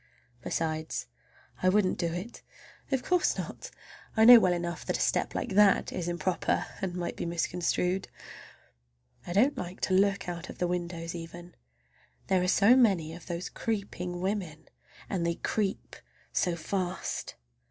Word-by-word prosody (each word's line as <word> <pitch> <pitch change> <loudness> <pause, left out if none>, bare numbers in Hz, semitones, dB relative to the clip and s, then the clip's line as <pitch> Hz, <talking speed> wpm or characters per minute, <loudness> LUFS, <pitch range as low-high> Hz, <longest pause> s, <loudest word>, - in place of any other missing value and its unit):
Besides 155 - -2 0.6
I 185 - +4
wouldn't 190 -1 +2
do 170 -2 0
it. 180 +8 -6 0.5
Of 265 -2 +1
course 360 -1 +2
not. - - -6 0.5
I 220 - +6
know 245 0 +11
well 185 -4 +3
enough 175 0 -3
that - - 0
a - - -9
step - - 0
like - - -2
that 205 0 +4
is 175 -2 -3
improper 175 +1 0 0.2
and 185 -2 -2
might 175 -1 -3
be - - -4
misconstrued. 180 +2 -1 1.2
I 175 - -3
don't 250 +10 +3
like 180 +1 -6
to 190 - 0
look 195 0 +2
out 175 0 -5
of - - -9
the 180 - 0
windows 175 -1 -3
even—there 165 - -6
are 180 - 0
so 205 +6 +6
many 190 -11 +3
of 170 - -11
those 175 0 -4
creeping 180 -5 -4
women, 185 -5 -3 0.4
and 185 -3 -2
they 170 0 0
creep 200 +1 -2 0.4
so 175 -2 +1
fast. 180 +2 -3
180 Hz, 150 wpm, -29 LUFS, 170-195 Hz, 1.2 s, know